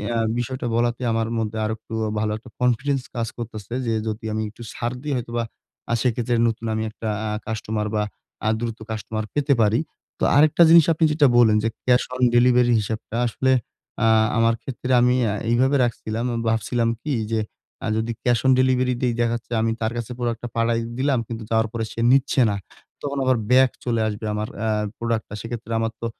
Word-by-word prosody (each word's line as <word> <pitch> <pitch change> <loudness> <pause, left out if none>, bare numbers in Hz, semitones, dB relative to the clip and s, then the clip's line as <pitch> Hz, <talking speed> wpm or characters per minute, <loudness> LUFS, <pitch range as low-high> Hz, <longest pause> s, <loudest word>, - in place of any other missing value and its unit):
আ - - +1 0.2
বিষয়টা 125 +1 -3
বলাতে 120 +1 0
আমার 115 0 0
মধ্যে 110 0 -2
আরেকটু 110 +1 -5 0.3
ভালো 105 0 0
একটা 120 +3 -14
কনফিডেন্স 130 +3 +1
কাজ 115 -1 -1
করতেছে 115 -2 -7
যে 115 - 0
যদি 110 0 -4
আমি 110 - -1
একটু 110 - -15
ছাড় 120 +1 -3
দিই 145 0 -3
হয়তোবা 120 -1 -3 0.5
আ - - +3
সেইক্ষেত্রে 120 -1 0
নতুন 115 0 -3
আমি 110 0 -1
একটা 110 +1 -7 0.2
আ - - -2 0.2
কাস্টমার 110 -1 -2
বা, 105 - +1 0.4
আ - - +4
দ্রুত 115 -1 -3
কাস্টমার 110 0 -3
পেতে 145 -1 +2
পারি। 110 +2 +3 0.4
তো - - -3
আরেকটা 155 +3 +6
জিনিস 165 -2 +8
আপনি 160 +1 +2
যেটা 150 -1 +4
বললেন 110 -3 +6
যে 115 - +2 0.2
ক্যাশ 125 0 +4
অন 125 - -1
ডেলিভারি 125 0 +5
হিসাবটা 110 +1 -4
আসলে 130 +3 0 0.5
আ - - +4 0.3
আমার 115 0 +3
ক্ষেত্রে 130 0 -4
আমি 125 +1 +4 0.2
আ - - -1 0.2
এইভাবে 130 +4 +3
রাখছিলাম। 115 -1 -2 0.2
ভাবছিলাম 115 +2 0
কি? 150 - -2 0.2
যে 110 - +1 0.4
আ - - -3
যদি 110 +1 -1
ক্যাশ 120 -2 +3
অন 130 - +6
ডেলিভারি 130 -1 +2
দেই, 125 -2 +1
দেখা 120 -1 +2
যাচ্ছে 120 0 -9
আমি 115 0 +1
তার 110 0 0
কাছে 120 0 -4
পুরো 120 -1 -1
একটা 120 +2 -7
পাঠায় 115 0 +1 0.2
দিলাম, 135 -1 +1
কিন্তু 115 -1 -6
যাওয়ার 110 0 +2
পরে 115 -1 -3
সে - - -8
নিচ্ছে 135 0 +3
না। 100 - -1 0.5
তখন 140 -1 -3
আবার 130 -1 +3
ব্যাক 130 0 +6 0.2
চলে 115 -2 +1
আসবে 105 +1 -4
আমার 105 +1 -2 0.2
আ - - +1 0.3
প্রোডাক্টটা। 115 -3 -2
সেক্ষেত্রে 115 0 -6
আমার 115 0 -1
তো - - -3
115 Hz, 195 wpm, -23 LUFS, 110-125 Hz, 0.5 s, জিনিস